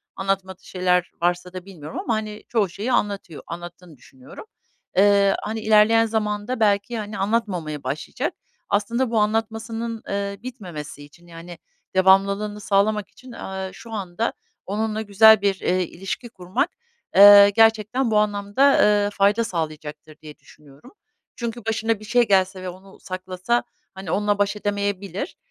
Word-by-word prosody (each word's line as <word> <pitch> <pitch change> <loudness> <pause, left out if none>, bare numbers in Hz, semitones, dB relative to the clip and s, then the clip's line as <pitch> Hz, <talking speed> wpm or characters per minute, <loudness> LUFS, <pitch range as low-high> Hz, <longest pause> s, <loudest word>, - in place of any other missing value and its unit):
Anlatmadığı 190 -1 -3
şeyler 180 -1 0
varsa 175 +1 -1
da 185 -1 -8
bilmiyorum 160 -6 -8
ama, 235 - -1
hani, 215 -1 -4
çoğu 215 -5 +1
şeyi 205 +8 -4
anlatıyor, 200 -8 -2
anlattığını 175 -1 -10
düşünüyorum. 130 - -14 0.5
Eee, 200 0 +5
hani, 220 +1 -4
ilerleyen 220 +1 +5
zamanda 215 +2 -2
belki, 205 +2 +1
hani, 210 -1 -6
anlatmamaya 190 -8 -2
başlayacak. 155 - -4 0.4
Aslında 230 +4 0
bu 225 - +2
anlatmasının, 225 +1 -2
ııı, 200 +1 -4
bitmemesi 175 - -8
için, 170 +4 -18
yani, 170 +1 -11 0.4
devamlılığını 200 +2 +3
sağlamak 205 +1 +1
için, 255 0 -15
eee, 190 -4 -6
şu 230 - -12
anda 205 +1 -3 0.3
onunla 215 +2 -2
güzel 220 0 +6
bir, 200 -2 0
eee, 185 0 0
ilişki 190 +7 -6
kurmak, 185 - -2 0.5
eee, 200 +1 +10
gerçekten 225 +3 +2
bu 215 - +3
anlamda, 210 +6 +2
eee, 205 -1 +3
fayda 200 +3 +2
sağlayacaktır 155 -5 -6
diye 150 -1 -12
düşünüyorum. 145 -1 -18 0.4
Çünkü 235 -1 -5
başına 225 -1 -1
bir 215 - -11
şey 240 +2 +2
gelse 190 -1 +2
ve 185 - -5
onu 190 +2 -14
saklasa, 185 +5 -2 0.3
hani, 190 0 -7
onunla 205 0 +1
baş 205 +1 0
edemeyebilir. 200 - -3
200 Hz, 140 wpm, -22 LUFS, 185-220 Hz, 0.5 s, eee